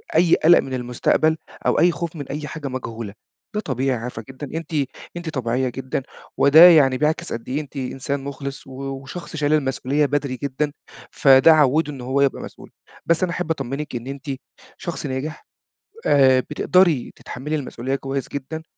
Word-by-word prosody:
أي 170 +1 +5
قَلَق 175 +2 +6
من 130 - -4
المستقبل 125 +6 +1 0.3
أو - - +3
أي 175 +3 +5
خوف 170 -1 -5
من 145 -4 -6
أي 150 +1 -5
حاجة 155 -1 -6
مجهولة. 115 -5 -5 0.4
ده 210 - +1
طبيعي 130 - -1
عارفة 115 -1 -6
جدًا 135 +2 -7
أنتِ 165 0 -7 0.4
أنتِ 175 -1 -5
طبيعية 130 -2 -1
جدًا 130 +1 -4 0.3
وده 160 +5 +9
يعني 135 -6 +5
بيعكس 155 +2 0
قد 115 +2 -6
إيه 145 +4 -1
أنتِ 145 - -14
إنسان 135 +2 -3
مُخلص 140 -1 -6
و 135 - -11
وشخص 135 +5 -7
شايل 150 0 +1
المسؤولية 140 0 +1
بدري 140 -2 -1
جدًا، 140 +2 -1 0.4
فده 135 +3 +6
عوِّده 150 +1 +3
إن 130 - -8
هو 130 +3 0
يبقى 140 - +1
مسؤول، - - -11 0.3
بس 170 +2 +2
أنا 175 - +1
أحب 180 -1 -2
أطمّنِك 140 -1 -4
إن 120 +2 -5
أنتِ 140 +2 -7 0.5
شخص 170 -3 -5
ناجح، 140 +3 -5 0.6
آآ 130 -2 +5
بتقدري 155 +1 +2
تتحمّلي 145 +5 -5
المسؤولية 135 -2 -3
كويس 135 0 -3
جدًا 145 +3 -6
140 Hz, 170 wpm, -22 LUFS, 130-155 Hz, 0.6 s, وده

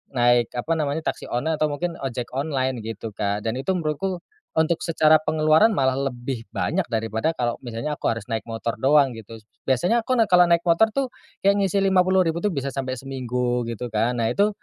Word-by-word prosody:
naik 120 -1 +4
apa 155 +7 -1
namanya 150 +2 -1
taksi - - -11
online 150 +6 -1
atau 155 - +3
mungkin 165 +4 -4
ojek 125 -3 -4
online 130 -2 -1
gitu, 110 0 -6
Kak. 100 0 -2
Dan 115 +3 -1
itu 185 +8 -1
menurutku, 175 +3 -2 0.4
untuk 160 +1 +2
secara 155 -2 +4
pengeluaran 155 +6 +4
malah 130 -1 +2 0.2
lebih 120 0 -5
banyak 190 +4 -1
daripada 110 +4 -1
kalau 120 -1 0
misalnya 120 +5 -4
aku - - -1
harus 115 -2 -3
naik 110 0 -2
motor 115 +1 -3
doang 140 -1 +4
gitu. 115 0 -10 0.3
Biasanya 175 - +2
aku 255 +2 0
naik 225 - +5
kalau 180 -3 +5
naik 170 0 +3
motor 175 +6 +4
tuh, 265 +2 -2 0.3
ya 200 - +6
ngisi 200 -1 0
Rp50.000 185 -3 +2
tu 210 - +1
bisa 140 -5 -3
sampai 130 -2 -3
seminggu 125 -2 -2
gitu 115 +1 -4
kan. 115 +3 +1
Nah 115 - +1
itu, 205 +7 +3
140 Hz, 195 wpm, -23 LUFS, 120-170 Hz, 0.4 s, ya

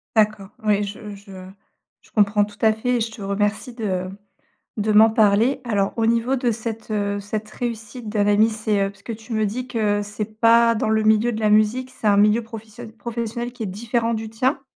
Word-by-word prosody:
D'accord, 210 -2 +2
oui, 210 -1 +2
je 205 0 -7
je 200 0 -15 0.7
je - - -24
comprends 205 -1 +3
tout 205 0 -15
à 220 -1 +5
fait 245 +3 -1
et - - -1
je 225 - -1
te 220 - -11
remercie 205 +4 -1
de 185 -5 -3 0.7
de 215 0 0
m'en 220 +2 +7
parler, 220 +5 +3
alors 205 -4 0
au 225 - +2
niveau 235 +3 +1
de 245 -2 0
cette, 225 0 -6
heu, 205 -1 -1
cette 210 +1 -5
réussite 230 0 -6
d'un 210 -1 +1
ami, 210 +2 +4
c'est, 215 -2 -1
heu, 195 - -4
parce 200 0 -21 0.2
tu 225 +2 -11
me 215 - +1
dis 240 +5 -3
que 215 -4 0
c'est 215 +1 -6
pas 230 0 +5
dans 215 - -1
le 220 0 +2
milieu 220 +2 +3
de 220 - -4
la 215 - +2
musique, 215 +5 +2
c'est 230 - -7
un 205 - +5
milieu 210 +3 +4
professio 225 +1 -10
professionnel 235 +1 -5
qui 245 -3 -6
est - - -3
différent 230 +4 -1
du 220 0 -5
tien? 255 +5 0
220 Hz, 210 wpm, -22 LUFS, 210-230 Hz, 0.7 s, m'en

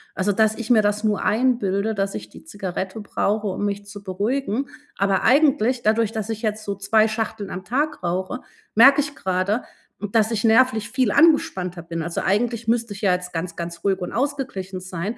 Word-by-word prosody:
also 195 +2 +1
dass 220 +1 +2
ich 230 -1 -6
mir 225 -3 +5
das 210 +1 0
nur 210 -2 +1
einbilde, 220 -3 +1
dass 195 0 -1
ich - - -7
die - - -14
Zigarette 190 - -5
brauche, 210 +1 -1
um 200 +1 -2
mich 205 0 -3
zu 205 0 -10
beruhigen. 225 +7 -2 0.3
Aber 195 -1 +1
eigentlich 265 -3 +3
dadurch, 220 0 +2
dass 220 -2 -4
ich 220 +1 -4
jetzt 215 0 -2
so 200 -1 -3
2 215 +3 +3
Schachteln 215 -2 -3
am 185 0 -6
Tag 280 +3 -1
rauche, 185 +7 -2 0.3
merke 270 +6 +7
ich 285 0 -6
gerade, 190 +5 -1 0.5
dass 220 -1 +3
ich 215 -2 -1
nervlich 225 -1 +3
viel 255 -5 +1
angespannter 185 - +3
bin. 165 -1 -4
Also, 170 +1 -3
eigentlich 230 +4 0
müsste 230 -1 0
ich 195 - -10
ja 195 -3 +3
jetzt 180 0 -4
ganz, 170 +1 -4
ganz 170 0 -6
ruhig 195 -1 +1
und 180 - -4
ausgeglichen 245 -9 -3
sein, 185 +5 -5
210 Hz, 195 wpm, -22 LUFS, 190-235 Hz, 0.5 s, merke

